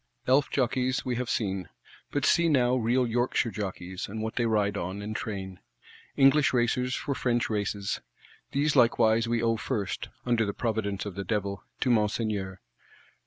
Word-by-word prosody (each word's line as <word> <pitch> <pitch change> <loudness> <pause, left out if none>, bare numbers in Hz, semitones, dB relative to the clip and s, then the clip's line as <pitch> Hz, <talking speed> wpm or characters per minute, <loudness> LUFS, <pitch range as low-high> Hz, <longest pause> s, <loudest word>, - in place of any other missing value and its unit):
Elf 135 +3 +3
jokeis, 130 0 0
we 125 -1 -1
have 125 -1 -3
seen; 95 -5 -1 0.4
but 145 0 -1
see 170 +1 +4
now 125 -4 +3
real 125 +1 +2
Yorkshire 120 0 0
jockeys, 95 -2 -5
and 110 +3 -6
what 110 +1 -4
they 120 -1 +1
ride 105 -2 +1
on, 95 +1 -3
and 105 +1 -5
train: 95 -4 -5 0.6
English 135 +1 +5
racers 125 +1 +1
for 140 - -2
French 120 -3 0
Races. 100 -1 -2 0.5
These 145 +2 +1
likewise 115 -2 +4
we 115 0 0
owe 115 -1 +2
first 105 -3 -3 0.2
(under 120 -2 +2
the 100 -2 -3
Providence 105 -4 -2
of 100 - -5
the 100 - -4
Devil) 100 -2 -2 0.2
to 125 - +2
Monseigneur. 105 -4 0
115 Hz, 165 wpm, -28 LUFS, 100-125 Hz, 0.6 s, English